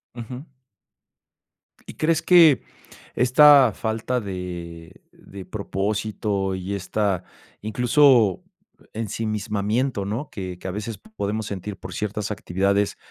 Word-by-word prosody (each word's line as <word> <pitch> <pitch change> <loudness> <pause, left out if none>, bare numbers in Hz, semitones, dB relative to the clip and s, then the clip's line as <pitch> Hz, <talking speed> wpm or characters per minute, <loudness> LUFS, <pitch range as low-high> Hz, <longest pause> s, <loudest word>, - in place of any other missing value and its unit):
Ujú. 125 +5 -8 1.4
Y, - - -7
crees 160 +1 +1
que 165 -6 +6 0.5
esta 135 0 +6
falta 110 +4 -2
de 90 -5 -7
de 95 -1 -12
propósito 100 0 -2
y 95 +2 -4
esta 100 -1 -1 0.4
incluso 120 - +3 0.5
ensimismamiento, 110 +1 -2
¿no?, 120 +8 -4
que 90 -2 -7
que - - -7
a - - -2
veces 105 +3 -5 0.2
podemos 105 +2 -2
sentir 100 0 -6
por - - -8
ciertas 105 0 -3
actividades, 100 0 0
105 Hz, 105 wpm, -23 LUFS, 100-120 Hz, 1.4 s, que